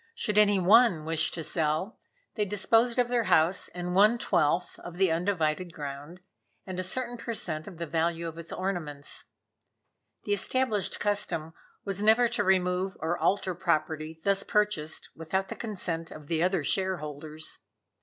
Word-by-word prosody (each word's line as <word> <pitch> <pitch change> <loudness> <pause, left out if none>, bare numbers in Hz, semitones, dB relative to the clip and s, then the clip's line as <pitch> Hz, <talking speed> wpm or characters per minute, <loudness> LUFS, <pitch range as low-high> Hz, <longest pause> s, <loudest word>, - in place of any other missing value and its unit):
Should 210 - +1
any 205 -1 +5
one 190 -3 +5
wish 160 -1 +2
to 165 - -4
sell, 155 +6 -1 0.3
they 215 - 0
disposed 225 +4 +2
of 245 -1 +3
their 240 -2 +1
house 165 +2 +3
and 180 0 -5
one 210 +5 +5
twelfth 170 -4 +1
of 175 0 -9
the 190 -2 +3
undivided 170 -1 0
ground, 145 +4 -7 0.4
and 185 -1 -5
a - - -1
certain 245 +5 -2
per 230 0 -5
cent. 155 -6 -2
of 190 -4 -9
the 170 - -3
value 165 +1 -1
of 165 0 -7
its 165 -1 -9
ornaments. 160 -7 -3 1.0
The 205 - 0
established 215 0 0
custom 185 -6 -1 0.3
was 200 -1 -2
never 220 +3 +5
to 235 -3 0
remove 185 0 +1
or 165 +2 -1
alter 190 0 +1
property 160 -2 -1
thus 200 0 +2
purchased 210 -9 -1
without 190 +4 -2
the - - -5
consent 175 -7 -4
of 155 - -10
the 165 -1 +1
other 180 -2 +1
shareholders. 155 -4 -2
180 Hz, 160 wpm, -28 LUFS, 160-205 Hz, 1.0 s, any